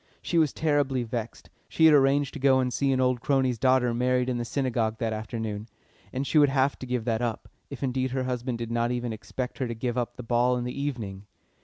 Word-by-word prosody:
She 170 - +1
was 155 -3 +3
terribly 145 -5 +1
vexed 115 -1 -6 0.2
she 160 - +3
had 160 - +8
arranged 140 0 +3
to - - -6
go 130 -1 +4
and 125 -1 0
see 140 -1 +1
an 130 - +1
old 125 -2 +1
crony's 130 -4 +1
daughter 130 -2 +3
married 125 +1 +1
in 125 -1 -1
the 120 - -2
Synagogue 115 -4 -1
that 115 -1 -1
afternoon, 110 -1 -4 0.4
and 130 +2 -2
she 155 - +3
would 145 -1 +6
have 135 0 +1
to 130 - -7
give 125 -2 -2
that 115 -1 0
up, 115 -2 -3 0.2
if 140 -1 -7
indeed 130 0 0
her 130 0 -2
husband 125 -1 -2
did 115 0 -5
not 120 0 +1
even 120 -1 -2
expect 125 +4 -6
her 130 - -1
to 115 - -4
give 120 +2 -2
up 120 0 -3
the 125 - -6
ball 120 +2 +2
in 120 - -2
the 125 +3 -4
evening. 105 -8 -4
125 Hz, 235 wpm, -27 LUFS, 120-135 Hz, 0.4 s, had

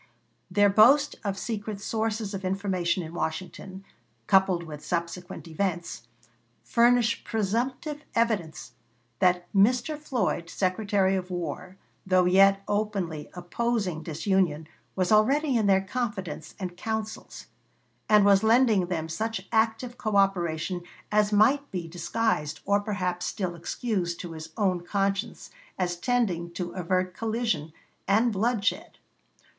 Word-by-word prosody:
Their 205 0 +4
boast 270 +8 +5
of 200 -2 -2
secret 210 -1 -4
sources 220 0 -2
of 195 -1 -5
information 185 -2 -1
in 160 +1 -8
Washington, 185 +3 -5 0.4
coupled 190 0 +3
with 150 -2 -9
subsequent 175 0 -4
events, 170 -7 -3 0.6
furnish 235 - +3
presumptive 245 - -2
evidence 190 - -1 0.5
that 180 -1 +3
Mr. 245 +9 +3
Floyd, 245 - -2
Secretary 195 +1 +1
of 185 -1 -3
War, 180 +1 -5 0.3
though 185 -1 +3
yet 195 +2 +5
openly 200 -7 -2
opposing 185 -1 -2
disunion, 165 -1 0 0.3
was 185 0 0
already 270 +7 +3
in 220 -3 +2
their 190 -1 +4
confidence 190 -8 -4
and 180 -2 -5
councils, 220 +3 -5 0.6
and 210 -2 +6
was 200 -1 +6
lending 220 -4 +4
them 165 -3 -2
such 205 +3 -3
active 225 +2 0
coõperation 185 -4 0 0.3
as 210 0 +3
might 265 +8 +3
be 175 -3 -4
disguised 170 -2 -1
or 200 +1 +3
perhaps 180 -4 -2
still 185 -2 -3
excused 175 0 -3
to 175 - -7
his 160 0 -8
own 185 -4 +1
conscience 195 +4 -2 0.3
as 180 -2 -1
tending 175 -4 0
to 175 -1 -4
avert 185 0 -1
collision 220 -7 -2 0.4
and 220 +4 +3
bloodshed. 215 +1 -1
195 Hz, 120 wpm, -27 LUFS, 175-220 Hz, 0.6 s, and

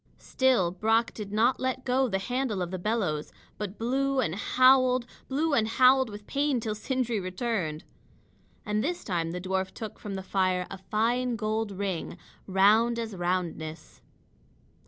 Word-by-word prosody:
Still 250 -10 +2
Brock 225 +5 +1
did 205 -2 -7
not 225 +5 +2
let 260 0 -2
go 260 +1 +2
the 195 -5 0
handle 245 -2 -2
of 175 - -5
the 185 - -4
bellows, 180 -7 -1 0.3
but 210 -1 -5
blew 270 +3 0
and 170 -11 0
howled 255 +3 +4 0.2
blew 295 +3 0
and 220 -5 +3
howled 255 +2 +4
with 205 0 -9
pain 280 0 0
till 220 -1 -2
Sindri 240 0 -1
returned. 185 -4 -3 0.8
And 210 0 0
this 350 +4 -2
time 170 -4 -1
the 180 +2 -4
dwarf 190 +1 -2
took 220 -1 -8
from 205 -2 -6
the 190 - -5
fire 185 -1 0
a 195 - -7
fine 235 +5 0
gold 215 -1 -2
ring, 190 -3 -4 0.3
round 215 +5 +4
as 225 -3 -4
roundness. 175 -3 -3
215 Hz, 155 wpm, -28 LUFS, 190-250 Hz, 0.8 s, howled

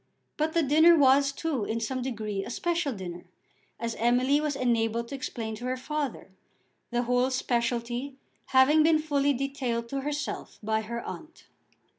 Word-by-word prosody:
But 310 +1 -1
the 335 - +3
dinner 315 +4 +6
was 275 0 +5
too, 280 -4 -2
in 220 +3 -2
some 255 +3 -2
degree, 215 -6 -3
a - - -7
special 340 +3 -1
dinner, 180 -5 -7 0.5
as 230 0 -2
Emily 250 +5 +3
was 300 -2 -1
enabled 235 -2 0
to 280 - -5
explain 230 -4 -4
to 240 - -7
her 255 0 -1
father, 280 -6 -4 0.6
the 240 0 0
whole 250 +1 +2
speciality 240 +1 -1 0.3
having 270 +4 +5
been 315 0 +5
fully 285 -2 +1
detailed 255 -3 -2
to 275 +1 -2
herself 290 +1 -4
by 220 +1 0
her 235 +2 -5
aunt. 325 0 -9
255 Hz, 160 wpm, -28 LUFS, 235-285 Hz, 0.6 s, dinner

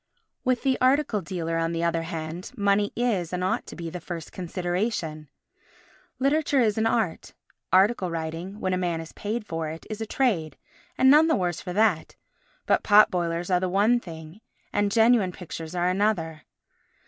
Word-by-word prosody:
With 255 -2 0
the 265 -2 +1
article 255 -5 +2
dealer, 165 -2 -3
on 165 0 -1
the 165 0 -2
other 170 -1 +1
hand, 165 +5 -6
money 200 0 +2
is, 215 -9 0
and 180 0 -2
ought 185 - -1
to - - -9
be, 170 -1 -6
the 180 - -5
first 170 -1 -7
consideration. 175 - -3 0.9
Literature 285 +1 +2
is 220 -3 +2
an 220 - +2
art; 220 -8 -1 0.4
article 190 0 +3
writing, 165 +4 -5
when 185 -3 -1
a 185 - 0
man 175 -2 -1
is 165 -1 -9
paid 215 +2 -4
for 165 -4 -3
it, 160 +1 -8
is 215 +1 -5
a 220 - -3
trade 185 - 0 0.4
and 265 +1 +6
none 305 +2 +6
the 320 - +3
worse 175 -3 -1
for 180 - -6
that; 205 -5 +1 0.5
but - - +2
pot 210 0 +6
boilers 175 0 -2
are 180 - +4
one 210 +6 +3
thing 165 0 -11 0.3
and 205 0 +1
genuine 225 -3 +4
pictures 165 -1 -8
are 175 0 +1
another. 180 -5 -1
185 Hz, 175 wpm, -26 LUFS, 165-220 Hz, 0.9 s, and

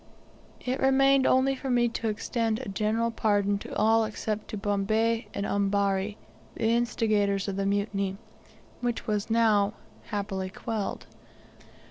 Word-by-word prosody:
It 255 +1 -2
remained 270 0 +4
for 270 +1 +2
me 245 -1 +3
only 240 - +2
to 230 0 -3
extend 225 +1 -1
a 260 -3 -6
general 220 +4 0
pardon 205 -2 +1
to - - -8
all 225 +1 +4
except 215 0 -3
to 215 - -5
Bombay 215 +3 0
and 200 - -3
Ambari, 200 0 0 0.4
the 225 - +1
instigators 215 -4 +1
of 195 - -2
the 195 0 -1
mutiny, 200 -1 -1 0.6
which 240 -2 -2
was 210 0 -1
now 215 -3 +3 0.3
happily 200 -3 -3
quelled. 210 +2 -4
215 Hz, 135 wpm, -28 LUFS, 200-230 Hz, 0.6 s, remained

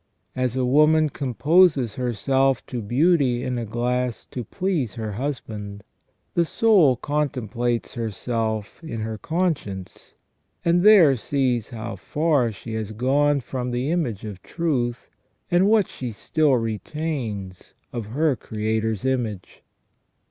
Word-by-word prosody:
As 130 -1 0
a 130 -1 +1
woman 150 +4 +4
composes 145 - +3
herself 130 +2 +1
to 125 -2 -5
beauty 130 - +2
in 125 -1 -2
a 115 - -3
glass 125 +2 -1
to 125 - -4
please 150 - -2
her 110 -2 -4
husband, 105 -5 -5 0.5
the 170 - +3
soul 175 - +4
contemplates 120 -5 -2
herself 110 - -3
in 115 -9 -5
her 110 0 -4
conscience, 155 - -3 0.5
and 170 +1 +4
there 185 -9 +7
sees 125 -2 -1
how 115 -1 -6
far 150 -6 +1
she 110 +2 -8
has 110 -1 -4
gone 140 +5 +2
from 125 0 -4
the 125 +4 -1
image 125 - -1
of 100 -4 -7
truth, 125 - -2 0.4
and 175 +3 +4
what 210 -3 +4
she 125 -2 -6
still 150 +6 +1
retains 115 - -4 0.2
of 115 -4 -4
her 145 +5 +1
Creator's 110 -1 -2
image." 120 -7 -2
125 Hz, 125 wpm, -23 LUFS, 110-150 Hz, 0.5 s, there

